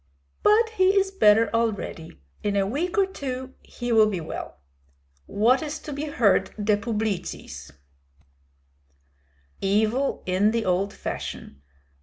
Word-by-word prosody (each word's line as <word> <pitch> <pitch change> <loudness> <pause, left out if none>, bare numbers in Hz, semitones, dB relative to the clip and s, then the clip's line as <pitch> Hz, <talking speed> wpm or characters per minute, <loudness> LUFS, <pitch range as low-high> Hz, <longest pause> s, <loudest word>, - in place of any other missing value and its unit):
"But 445 +2 +4
he 375 +1 +4
is 385 0 -1
better 225 - +4
already. 215 - -2 0.2
In 205 -1 -1
a 195 -1 +2
week 315 - -2
or 395 - +5
two 260 -7 -6
he 240 -1 -6
will 220 -1 +6
be 195 -4 -2
well. 160 - -7 0.7
What 235 +7 +3
is 310 0 -4
to 300 - -8
be 285 +2 -4
heard 205 -9 +2
de 210 0 +2
publicis?" 210 - -4 1.9
"Evil 220 +7 +1
in 185 +3 +2
the 230 0 -1
old 185 +2 +1
fashion. 70 - -7
225 Hz, 130 wpm, -25 LUFS, 205-285 Hz, 1.9 s, will